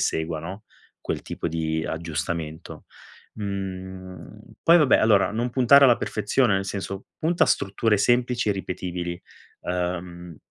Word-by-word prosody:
segua, 80 -1 -1
no, 95 +6 -8 0.4
quel - - -4
tipo - - -5
di 80 0 -2
aggiustamento. 80 0 -5 0.5
Mhmm, 95 -2 -6 0.2
poi 170 +1 +7
vabbè, 150 -4 +5
allora 105 -3 +4
non 120 +3 -2
puntare 135 +3 +6
alla 120 -3 +6
perfezione. 105 +1 +1
Nel 95 0 0
senso, 95 0 -5
punta 170 +2 +2
a - - -4
strutture 105 +2 +1
semplici 120 +2 +1
e - - +3
ripetibili. 90 -2 -5 0.4
Uhm, 90 -1 -4
95 Hz, 130 wpm, -24 LUFS, 85-110 Hz, 0.5 s, poi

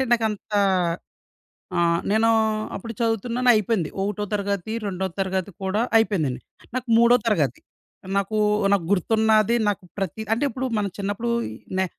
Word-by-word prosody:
అంటే 265 - +2
నాకు 230 -2 +3
అంత 210 0 -7 1.3
ఆహ్, 170 0 +3
నేను 220 +2 +3 0.5
అప్పుడు 230 +4 -6
చదువుతున్నాను 235 +2 0
అయిపోయింది. 215 -5 0
ఒకటో 205 +1 -2
తరగతి, 200 0 -2
రెండో 190 -1 -2
తరగతి 190 0 -1
కూడా 190 +4 0 0.2
అయిపోయిందండి. 160 - +1 0.4
నాకు 255 -1 -3
మూడో 235 +1 +6
తరగతి 150 - +1 0.6
నాకూ, 205 +2 0 0.3
నాకు 180 -5 +1
గుర్తున్నది 220 +3 +3
నాకు 200 -1 -3
ప్రతి 195 +2 -3
అంటే, 235 +5 -1
ఇప్పుడు 260 +3 -4
మనం 205 -1 0
చిన్నప్పుడు 205 +4 -2 0.5
నే 190 - +2
210 Hz, 135 wpm, -23 LUFS, 190-225 Hz, 1.3 s, మూడో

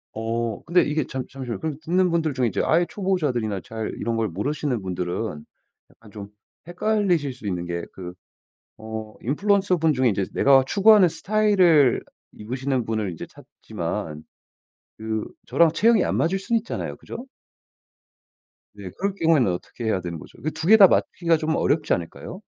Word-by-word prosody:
어 115 0 -3
근데 175 +1 +4
이게 150 -1 -1
잠 130 -1 -4
잠시만요. 125 -6 -6
그럼 155 -3 -4
듣는 180 +1 +2
분들 160 -4 0
중에 125 -2 +1
이제 105 - -1
아예 170 +2 +3
초보자들이나 140 - -1
잘 110 -1 -5
이런 115 +1 -2
걸 115 -1 0
모르시는 125 - -2
분들은 90 -2 -4 0.5
약간 110 -2 -19
좀 100 -2 -9 0.4
헷갈리실 175 -6 0
수 125 -4 -9
있는 90 -3 -3
게 85 0 -4
그 90 -2 -8 0.7
어 110 -1 -7
인플루언서 190 - +1
분 160 -1 +2
중에 130 -3 +2
인제 100 -2 -1
내가 135 -1 +5
추구하는 205 0 +6
스타일을 175 - +3 0.3
입으시는 130 +2 -3
분을 110 -4 -2
이제 80 - -7
찾지만 75 -1 -6 0.8
그 110 0 -3 0.2
저랑 165 -2 +3
체형이 225 0 +4
안 - - -1
맞을 180 +4 +1
수는 230 +5 -1
있잖아요 235 - -5
그죠? 250 - -9 1.5
네. - - -8
그럴 200 0 -1
경우에는 160 - +3
어떻게 90 +6 -8
해야 105 -4 0
되는 85 -1 -5
거죠? - - -14
그 155 - -1
2 160 - -5
개 220 +3 +8
다 200 -3 +9
맞추기가 170 -2 +1
좀 160 0 -1
어렵지 150 0 +1
않을까요? 85 -1 -6
135 Hz, 350 characters per minute, -23 LUFS, 110-175 Hz, 1.5 s, 다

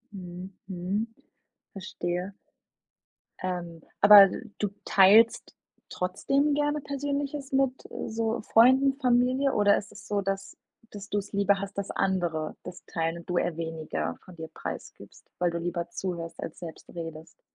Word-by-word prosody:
Mhm, 180 -1 -8 0.2
mhm. 190 +4 -2 0.7
Verstehe. 185 -1 -4 1.1
Ähm, 175 -3 -4 0.2
aber 205 -1 +10
d - - -6 0.2
du 205 - 0 0.2
teilst 210 +4 +5 0.4
trotzdem 275 +11 0
gerne 295 +1 0
Persönliches 280 0 -3
mit 270 -1 +1 0.2
so 225 0 -1
Freunden, 260 +5 +5
Familie 255 +1 +2
oder 205 -1 +4
ist 200 - -6
es 200 +1 -13
so, 205 -1 0
dass 195 0 -4 0.3
dass 205 -1 -9
du's 205 -1 -2
lieber 200 -1 +2
hast, 200 0 -7
dass 200 -1 -3
andere 175 -5 -1
das 180 - -9
teilen 165 0 -2
und 170 - -15
du 175 - 0
eher 175 -1 0
weniger 160 - -4
von 180 - -13
dir 160 -1 -8
preisgibst, - - -8
weil 175 0 +2
du 170 - -3
lieber 170 0 -3
zuhörst 170 -2 -5
als 160 - -7
selbst 165 -3 -10
redest? 165 -1 -8
195 Hz, 145 wpm, -27 LUFS, 175-230 Hz, 1.1 s, aber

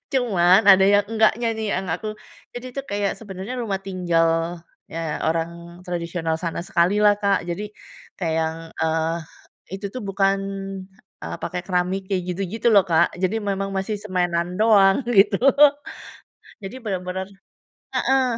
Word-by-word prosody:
cuman 195 -6 +4
ada 190 0 +7
yang 205 0 +4
enggaknya 225 +1 +2
nih, 220 -1 -2
yang 190 +1 -2
aku 215 +6 -3 0.4
jadi 245 +1 -7
itu 275 - -3
kayak 200 -1 -1
sebenarnya 205 +3 -7
rumah 205 -5 -2
tinggal, 170 -2 0 0.3
eee, 165 -2 -3
orang 170 +2 -3
tradisional 170 -2 -3
sana 170 0 -4
sekali 180 +4 +1
lah, 205 -1 +5
Kak. 200 -1 +1
Jadi, 200 +5 -3 0.5
kayak 165 -4 -1
yang, 160 0 -1 0.2
eee, 160 +1 0 0.6
itu 200 +1 -5
tuh 255 - -5
bukan, 195 0 +1 0.8
eee, 85 +1 -5
pakai 180 0 -3
keramik 185 +1 -1
kayak 185 -2 0
gitu-gitu 200 +5 -1
loh 200 - +7
Kak, 170 -1 +2
jadi 190 +4 0
memang 195 -1 -2
masih 195 +2 -2
semenan 180 -3 -1
doang 205 0 +5
gitu. 195 -3 +4 1.3
Jadi 195 +6 -7
bener-bener 190 -2 -3 0.7
heeh. 265 0 +2
190 Hz, 140 wpm, -22 LUFS, 170-205 Hz, 1.3 s, ada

